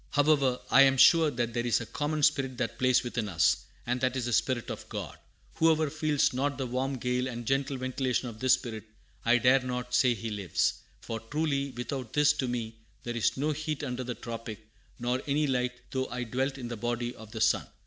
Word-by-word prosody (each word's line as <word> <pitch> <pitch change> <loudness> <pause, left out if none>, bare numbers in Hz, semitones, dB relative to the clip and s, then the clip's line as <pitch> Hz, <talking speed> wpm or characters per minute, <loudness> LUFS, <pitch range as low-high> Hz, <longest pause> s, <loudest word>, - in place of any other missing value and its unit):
"However, 145 -3 +3
I 135 - +8
am 135 -1 +5
sure 160 +4 +7
that 120 -3 -2
there 120 - -1
is 120 -1 +2
a 115 - -5
common 150 +5 -2
spirit 135 -4 +2
that 115 -3 -3
plays 130 -1 +3
within 120 -3 -3
us, 80 -5 +3 0.3
and 125 +1 -1
that 130 0 +1
is 125 - -2
the 120 - -2
Spirit 125 -2 0
of - - -8
God. - - -5 0.4
Whoever 160 -2 +3
feels 155 -3 +1
not 140 +1 -1
the 135 - -2
warm 130 +2 -2
gale 125 +1 -1
and 120 -2 -6
gentle 135 +2 0
ventilation 130 0 -1
of 110 -2 -8
this 130 +1 +4
Spirit, 110 -5 -2 0.4
I 120 +1 +5
dare 130 +3 +5
not 125 -1 -4
say 125 -1 +4
he 115 +1 -5
lives; 100 -4 0 0.2
for 115 -1 -5
truly 140 +3 -1
without 125 -1 -5
this 150 0 +4
to 135 -3 -2
me 115 -2 -4 0.3
there 120 0 -4
is 115 - +1
no 150 +3 0
heat 155 0 -3
under 130 -2 -3
the 125 -1 -4
tropic, 115 -2 -7 0.3
nor 125 +1 -1
any 150 +2 +2
light 125 -2 0 0.2
though 130 0 -1
I 125 +1 -4
dwelt 130 +4 -2
in 120 -3 -6
the 120 - -5
body 120 +2 -2
of 110 -1 -12
the 110 - -6
sun." - - +2
125 Hz, 215 wpm, -29 LUFS, 120-140 Hz, 0.4 s, I